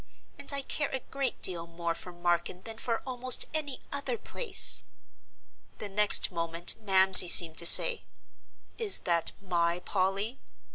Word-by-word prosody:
And - - -1
I 280 -1 -7
care 290 +2 -6
a 265 - -8
great 275 -2 -8
deal 170 -2 -2
more 170 0 -8
for 180 - -11
Marken 175 +1 -6
than 225 0 -12
for 230 -2 -7
almost 255 -1 +3
any 290 -4 -8
other 280 +11 -7
place." 470 +2 -1 1.0
The 210 - -10
next 205 0 +3
moment 170 0 -3
Mamsie 190 -3 +6
seemed 165 -2 +6
to 170 - +3
say, 475 - +6 0.7
"Is 440 -4 -1
that 170 -2 -2
my 170 -2 -4
Polly?" 195 +6 -7
195 Hz, 145 wpm, -24 LUFS, 175-260 Hz, 1.0 s, Mamsie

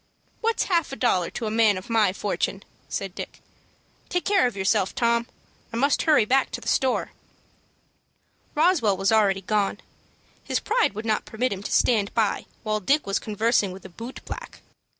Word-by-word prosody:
"What's 455 0 +1
half 340 -6 +1
a - - -4
dollar 185 -10 +1
to 230 - -5
a 215 - -2
man 220 -3 +4
of 185 - -8
my 220 -4 +3
fortune?" 200 0 -2 0.3
said 195 -2 -4
Dick. - - -8 0.7
"Take 360 - -1
care 395 -7 +4
of 245 - -6
yourself, 195 0 +1
Tom. 235 0 +1 0.4
I 230 - -4
must 280 +4 +2
hurry 305 -9 +4
back 265 +4 +2
to - - -3
the - - -11
store." 260 -1 +1 1.4
Roswell 295 - +3
was 195 +2 +1
already 200 -3 +3
gone. 205 +1 0 0.6
His - - -1
pride 455 - +1
would 215 +2 -5
not 215 -1 0
permit 245 +1 -1
him 195 - -6
to - - -6
stand 210 -5 +3
by 220 -3 0 0.2
while 215 -1 0
Dick 280 +9 +2
was 195 0 0
conversing 215 -1 +1
with 185 +1 -11
a - - -8
boot 230 +8 -9
black. - - -8
220 Hz, 180 wpm, -25 LUFS, 200-260 Hz, 1.4 s, man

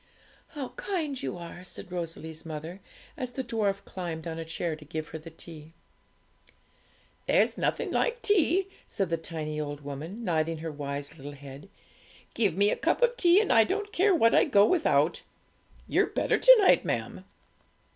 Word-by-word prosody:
'How 275 -4 -4
kind 340 - -3
you - - -4
are!' 175 +1 -9
said 180 0 -9
Rosalie's 165 -2 -6
mother, 160 +3 -7 0.4
as 255 -3 -4
the 265 - -3
dwarf 210 -4 -1
climbed 170 -4 -5
on 165 -1 -4
a 165 - -5
chair 165 0 -3
to 155 - -13
give 155 +1 -5
her 160 - -6
the 160 +2 -10
tea. 160 -1 -11 1.5
'There's - - +3
nothing - - -1
like 485 -1 0
tea,' 380 -1 +3 0.2
said 195 -4 -2
the 165 - +2
tiny 155 -2 -4
old 145 -1 -5
woman, 150 +10 -7
nodding 165 -3 0
her 160 +1 -5
wise 145 +1 -5
little 145 0 -8
head; 140 +5 -11 0.6
'give 200 -7 +1
me 205 +1 +4
a - - +1
cup - - +1
of 485 0 +3
tea, 355 -4 +5
and 420 -11 +2
I 225 -2 +7
don't 410 - -3
care 390 0 +4
what 230 -8 +4
I - - +6
go 205 -8 +5
without! 330 +7 +2 0.7
You're - - +2
better - - 0
to - - +9
night, 385 - +5
ma'am.' - - -3
175 Hz, 175 wpm, -28 LUFS, -, 1.5 s, to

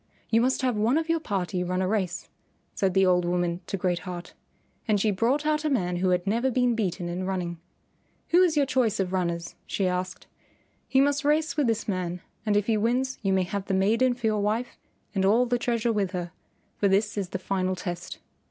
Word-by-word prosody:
"You 225 0 +4
must 260 +2 +1
have 250 -3 +1
one 225 +7 +2
of 325 0 -2
your 330 0 +2
party 185 - -2
run 180 +1 -1
a - - 0
race," 185 -4 -1 0.5
said 190 -1 0
the 190 0 +5
old 180 -1 +3
woman 175 0 -1
to 195 - -2
Great 180 -1 0
Heart. 175 -1 -7 0.5
And 210 -2 +3
she 215 +2 +2
brought 245 +10 +1
out 305 0 +1
a 305 - +1
man 180 -10 0
who 185 +1 +1
had 180 0 +1
never 230 +6 +1
been 250 -1 +2
beaten 185 -5 -2
in 180 +2 -3
running. 175 -3 -3 0.7
"Who 350 +2 +5
is 340 -4 +3
your 285 - +4
choice 250 -5 +1
of 190 -1 -1
runners?" 170 -2 -2
she 195 - -1
asked; 185 0 -3 0.6
"he 265 - +3
must 285 +2 +2
race 305 +2 +2
with 295 -5 +2
this 225 -1 -1
man, 180 -3 -2 0.3
and 205 -1 +3
if 205 - +1
he 225 -1 +2
wins 250 +4 0
you 195 -3 0
may 190 -1 +3
have 195 +2 -4
the 195 - 0
maiden 230 +6 +3
for 240 -2 -6
your 215 -1 +2
wife 220 +4 -1 0.4
and 195 -2 0
all 220 +6 +4
the 245 0 0
treasure 235 -1 0
with 200 -3 -1
her, 175 -1 -3 0.5
for 200 - +2
this 200 +2 +2
is 195 -3 -2
the 190 - -3
final 185 0 -1
test. 175 -1 -5
200 Hz, 220 wpm, -26 LUFS, 185-245 Hz, 0.7 s, the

